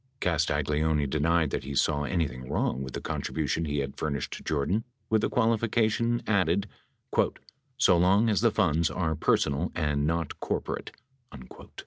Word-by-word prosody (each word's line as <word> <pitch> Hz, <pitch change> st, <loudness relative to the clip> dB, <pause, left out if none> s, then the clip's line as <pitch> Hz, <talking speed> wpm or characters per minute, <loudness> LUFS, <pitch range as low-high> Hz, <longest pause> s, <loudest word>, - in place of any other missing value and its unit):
Castagleoni 75 Hz, -2 st, +1 dB
denied 80 Hz, +1 st, +1 dB
that -, -, -2 dB
he 70 Hz, +1 st, -5 dB
saw 75 Hz, +1 st, +1 dB
anything 70 Hz, -6 st, -2 dB
wrong 65 Hz, -, 0 dB
with 65 Hz, -1 st, -6 dB
the -, -, -4 dB
contribution 80 Hz, +1 st, -2 dB
he 75 Hz, -1 st, -2 dB
had 70 Hz, 0 st, -6 dB
furnished 70 Hz, -4 st, -2 dB
to -, -, -7 dB
Jordan 80 Hz, +9 st, 0 dB, 0.3 s
with 110 Hz, -1 st, +4 dB
the -, -, 0 dB
qualifica 115 Hz, -1 st, +2 dB
tion 115 Hz, +2 st, 0 dB
added 100 Hz, -1 st, +1 dB, 0.6 s
— -, -, -8 dB, 0.3 s
"so 95 Hz, -9 st, +5 dB
long 95 Hz, +6 st, +4 dB
as 105 Hz, -2 st, +2 dB
the 115 Hz, -, +5 dB
funds 85 Hz, -7 st, +2 dB
were 80 Hz, -4 st, -1 dB
personal 75 Hz, +1 st, +1 dB
and 75 Hz, -3 st, 0 dB
not 80 Hz, -2 st, -2 dB
corporate." -, -, -3 dB
80 Hz, 155 wpm, -28 LUFS, 75-100 Hz, 0.6 s, so